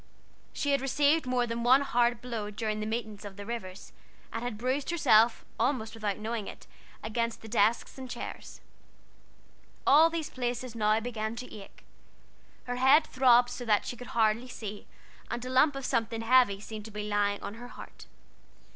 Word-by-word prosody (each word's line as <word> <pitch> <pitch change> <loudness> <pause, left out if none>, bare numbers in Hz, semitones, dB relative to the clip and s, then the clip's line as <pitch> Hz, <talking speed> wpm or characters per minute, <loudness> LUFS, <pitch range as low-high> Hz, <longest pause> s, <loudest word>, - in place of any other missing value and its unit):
She 285 - -1
had 280 -2 +2
received 285 +2 +2
more 250 -1 +1
than 230 0 -3
one 255 +3 +5
hard 240 -3 +1
blow 230 -4 -4
during 215 0 -3
the 215 - -3
meetings 220 -2 -4
of 200 -1 -9
the 205 - -7
waters, 200 -5 -7 0.4
and 225 - -3
had 245 -3 -4
bruised 260 +5 -1
herself 230 -9 +4
almost 230 -2 0
without 215 -3 -2
knowing 220 -1 -4
it, - - -10 0.4
against 230 +1 -2
the - - -8
desks 220 +4 +1
and 260 -1 -7
chairs. 240 - -8 1.2
All 315 +4 +7
these 330 -2 -4
places 245 -1 -3
now 215 -1 +2
began 220 -1 -4
to 250 +2 -8
ache: 200 -2 -12 0.8
her 245 0 -4
head 270 +5 +6
throbbed 245 -3 +4
so 245 - -6
that 210 -2 +2
she - - -4
could 245 0 -9
hardly 225 +2 +2
see, 210 -4 -8 0.4
and 240 +1 -4
a 255 - -5
lump 275 +3 +4
of 275 -1 -5
something 230 -2 -1
heavy 225 -4 +4
seemed 215 0 -8
to - - -8
be 210 -1 -5
lying 205 -1 +1
on 200 - -5
her 240 +2 -10
heart. - - -12
235 Hz, 180 wpm, -29 LUFS, 215-255 Hz, 1.2 s, All